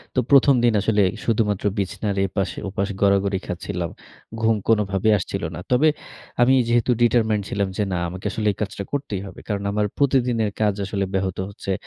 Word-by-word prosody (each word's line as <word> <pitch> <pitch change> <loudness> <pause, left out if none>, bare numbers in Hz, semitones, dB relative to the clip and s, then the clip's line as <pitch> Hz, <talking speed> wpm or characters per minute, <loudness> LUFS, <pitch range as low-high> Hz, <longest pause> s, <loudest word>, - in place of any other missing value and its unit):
তো - - +3
১ম 140 0 +6
দিন 120 -1 +4
আসলে 105 0 +2 0.2
শুধুমাত্র 105 -3 0
বিছানার 100 +1 -2
এপাশে 95 0 -3
ওপাশে 100 +1 -2
গড়াগড়ি 100 -1 +2
খাচ্ছিলাম। 85 -1 -4 0.5
ঘুম 115 0 +3
কোনোভাবেই 105 -1 +2
আসছিল 95 +1 -4
না। - - -6
তবে 130 +5 +4 0.5
আমি 125 +2 +5
যেহেতু 120 +1 +2
ডিটারমাইনড 110 -3 +3
ছিলাম 100 -1 0
যে 105 - +1
না 90 - 0
আমাকে 95 +3 -9
আসলে 105 0 -2
এই - - -21
কাজটা 100 -1 -3
করতেই 135 -9 -3
হবে, 95 - -11
কারণ 100 -2 -2
আমার 105 +1 +1
প্রতিদিনের 125 -6 +2
কাজ 105 -1 +3 0.4
ব্যাহত 95 -1 -1
হচ্ছে 100 -1 -6
105 Hz, 165 wpm, -22 LUFS, 100-115 Hz, 0.5 s, ১ম